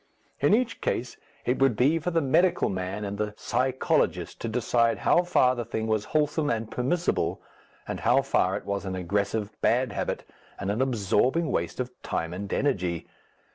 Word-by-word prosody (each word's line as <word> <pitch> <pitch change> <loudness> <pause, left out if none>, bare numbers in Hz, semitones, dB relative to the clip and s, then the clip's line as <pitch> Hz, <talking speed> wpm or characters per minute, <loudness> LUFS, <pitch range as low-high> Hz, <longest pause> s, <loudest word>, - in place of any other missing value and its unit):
In 205 - +5
each 230 -2 -1
case 125 - -2 0.3
it 125 - +1
would 135 -4 +4
be 145 +8 +3
for 165 - -2
the 165 -1 +1
medical 175 +7 +3
man 95 +2 -3
and 100 0 -5
the 105 0 -2
psychologist 130 +2 0
to - - -2
decide 115 0 +2
how 175 - +4
far 155 -8 +3
the 120 -2 -3
thing 110 -1 -3
was 110 -1 0
wholesome 150 0 +1
and 110 -2 -2
permissible, 130 - 0 0.5
and - - -4
how - - +3
far - - +1
it - - -9
was 100 0 -2
an 95 -1 -4
aggressive 100 +4 -1
bad 125 +1 +2
habit - - -3 0.3
and 100 - -2
an 110 +5 -1
absorbing 130 - +1
waste 85 +7 -2
of 125 0 -2
time 80 +1 -3
and 100 +2 -5
energy. 90 - 0
120 Hz, 175 wpm, -27 LUFS, 100-135 Hz, 0.5 s, In